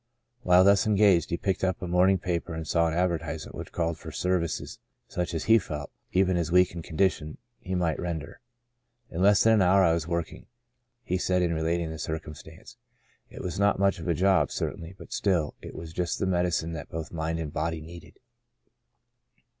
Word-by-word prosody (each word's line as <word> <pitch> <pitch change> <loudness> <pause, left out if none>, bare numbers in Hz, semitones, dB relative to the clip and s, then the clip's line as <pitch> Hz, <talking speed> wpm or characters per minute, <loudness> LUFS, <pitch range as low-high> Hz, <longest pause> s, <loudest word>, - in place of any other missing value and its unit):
While 90 0 +5
thus 100 +2 +4
engaged 100 -5 +4
he 85 - -1
picked 95 +1 -2
up 95 -1 0
a 90 - -5
morning 90 +2 +4
paper 85 -2 -3
and 80 -1 -5
saw 85 -1 +2
an 80 - -2
advertisement 85 -3 -2
which - - -8
called 85 -1 -2
for - - -8
services 90 -3 -2 0.3
such 90 -1 -3
as 80 - -2
he 115 +1 +5
felt, 75 -6 -6 0.2
even 95 0 +3
in 90 - +1
his 85 -1 -1
weak 90 0 +5
ened 85 -1 -7
condition, 80 -3 -1 0.2
he 95 - -4
might 85 -3 0
render. 80 -5 -5 0.7
"In 85 - -3
less 100 +1 +5
than 115 - +5
an 110 - +4
hour 95 +1 +5
I 85 -3 +4
was 85 -1 -2
working," 85 -1 -4 0.6
he 90 -3 -1
said 90 0 +1
in 85 -1 +1
re 80 - -2
lating 85 0 -1
the 80 - -7
circumstance. 80 0 -7 0.3
" - - -36
It - - -9
was 90 +1 -4
not 100 0 +3
much 100 -1 +2
of 80 - -7
a 85 - +1
job, 95 +3 +3
certainly, 85 +3 -5
but - - -10
still, 85 -7 0
it - - -9
was 80 0 -8
just 90 0 -1
the - - -1
medicine 90 -2 0
that 75 -3 -7
both 80 -1 -6
mind 80 0 -2
and 80 -3 -5
body 80 +1 -2
needed." 85 +1 -12
85 Hz, 205 wpm, -27 LUFS, 80-95 Hz, 0.7 s, While